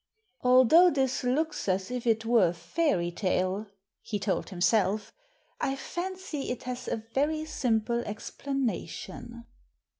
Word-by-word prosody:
"Although 260 +8 +7
this 265 -5 0
looks 295 0 0
as 190 +3 0
if 250 -1 -3
it 225 0 +2
were 225 -5 +5
a 170 - -1
fairy 175 - 0
tale," 185 +2 -1 0.3
he 210 - -3
told 200 -1 -1
himself, 200 +2 +1 0.5
"I 270 - 0
fancy 350 0 -5
it 245 - -4
has 250 0 -5
a 220 - -2
very 310 +3 +1
simple 235 -5 0
ex 210 +1 -6
planation." 240 -3 -4
240 Hz, 130 wpm, -29 LUFS, 205-275 Hz, 0.5 s, Although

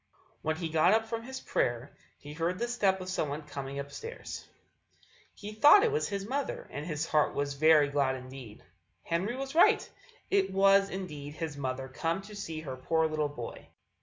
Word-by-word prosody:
When 155 0 0
he 165 0 -3
got 160 +4 +4
up 225 0 +1
from 225 0 -4
his 260 +3 -7
prayer 120 +3 -1 0.2
he 145 0 -10
heard 165 +3 -1
the 240 +4 -1
step 200 -6 +1
of 185 - -7
someone 150 -4 -2
coming 140 -2 -6
upstairs; 290 - -7 0.9
he 210 0 -8
thought 295 - +7
it 465 - +3
was 450 +1 0
his 200 -1 -4
mother, 275 +3 -3
and 145 +3 -5
his 155 -1 -2
little - - -11
heart - - +1
was 140 0 -1
very 155 0 +5
glad 140 -2 +1
indeed. 130 -4 -10 0.4
Henry 185 +8 -1
was 270 +1 -5
right: 335 - +5 0.4
it 390 0 +2
was 195 +1 +5
indeed 150 -6 -6
his 160 -3 -4
mother 130 -1 -3
come 165 +8 -2
to 210 +1 -11
see 165 -6 -5
her 135 -4 -6
poor 160 +5 +1
little 155 -1 0
boy. 120 -5 -8
160 Hz, 190 wpm, -30 LUFS, 145-205 Hz, 0.9 s, thought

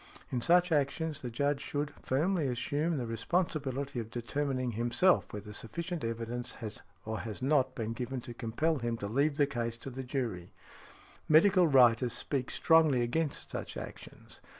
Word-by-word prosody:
In 125 - -1
such 175 +6 +4
actions 150 +1 0
the 125 - -4
Judge 140 +4 0
should 145 0 -2
|77| - - -19
firmly 155 +3 +1
assume 150 +6 -1
the 125 - -2
responsibility 140 +1 -1
of 115 -1 -5
determining 130 +1 -2
himself 120 - +2
whether 105 0 -7
sufficient 170 +9 -4
evidence 115 +1 -3
has 110 -2 -6 0.2
or 110 0 -3
has 110 +1 -6
not 130 -2 +2
been 115 -1 -3
given 125 +2 -4
to 120 - -8
compel 130 +7 -1
him 120 -1 -2
to 100 - -4
leave 140 +7 +1
the 145 - +5
case 120 -4 -3
to 135 - -8
the 130 +2 -5
jury". 120 -9 -3 0.8
Medical 180 +3 +6
writers 125 -3 +5
speak 130 +1 -1
strongly 160 -7 +4
against 150 +5 -2
such - - -5
actions. - - -9
130 Hz, 165 wpm, -31 LUFS, 115-150 Hz, 0.8 s, Medical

